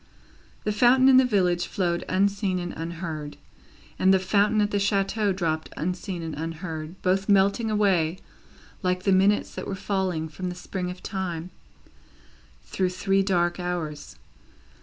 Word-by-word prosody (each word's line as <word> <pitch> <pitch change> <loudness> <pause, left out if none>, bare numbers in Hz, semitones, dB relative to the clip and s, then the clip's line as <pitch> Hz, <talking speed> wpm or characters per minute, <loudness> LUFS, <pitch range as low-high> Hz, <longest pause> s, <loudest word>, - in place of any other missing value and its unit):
The 210 - 0
fountain 250 +5 +5
in 260 - +7
the 260 - +6
village 180 -7 +1
flowed 175 -3 -1
unseen 195 0 +1
and 175 -1 -4
unheard, 160 -3 -5 0.6
and 190 - +5
the 190 - +6
fountain 205 +3 +2
at 205 0 +1
the 205 - +1
chateau 200 +1 +1
dropped 160 -4 -2
unseen 180 +1 -3
and 160 -1 -5
unheard 160 +1 -6
both 190 +2 +1
melting 200 +3 +3
away, 190 -6 +2 0.6
like 180 0 0
the 195 - +2
minutes 195 +2 +3
that - - -6
were 195 - -3
falling 185 -5 -2
from 180 +4 -5
the 180 - -6
spring 180 0 -4
of 180 0 -9
Time 180 -3 -4 1.1
through 185 -1 -1
three 195 +2 +1
dark 175 -2 +1
hours. 170 -4 -4
185 Hz, 150 wpm, -25 LUFS, 175-200 Hz, 1.1 s, in